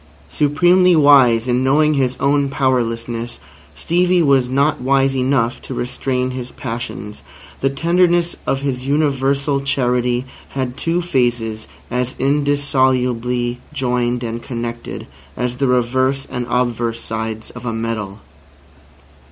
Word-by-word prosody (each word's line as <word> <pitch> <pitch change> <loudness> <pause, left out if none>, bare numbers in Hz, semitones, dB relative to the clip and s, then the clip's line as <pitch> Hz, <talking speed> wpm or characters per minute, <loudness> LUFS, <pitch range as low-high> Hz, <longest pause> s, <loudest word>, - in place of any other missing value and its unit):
Supremely 175 +5 +4
wise 130 -6 +5
in 125 +1 +1
knowing 150 +3 +3
his 130 -3 0
own 140 0 +2
powerlessness, 120 -3 -1 0.4
Stevie 180 +1 +2
was 135 -4 +3
not 140 +3 +1
wise 135 +1 +2
enough 130 -2 0
to 130 - -7
restrain 125 +1 -2
his 125 -1 -6
passions. 115 - -6 0.4
The 135 - +1
tenderness 175 +3 +2
of 135 - 0
his 130 -2 -3
universal 140 -1 +1
charity 125 -2 0 0.3
had 130 -2 -2
two 170 +4 -1
phases 120 -7 -1 0.2
as 125 +1 -2
indissolubly 130 -4 +1
joined 125 -3 -1
and 115 0 -4
connected 120 -1 -6 0.3
as 125 0 -2
the 135 +1 +1
reverse 130 +2 +1
and 120 -1 -3
obverse 120 -2 0
sides 110 0 -5
of 125 - -10
a 120 - -2
medal. 110 -3 -4
130 Hz, 120 wpm, -18 LUFS, 120-140 Hz, 0.4 s, wise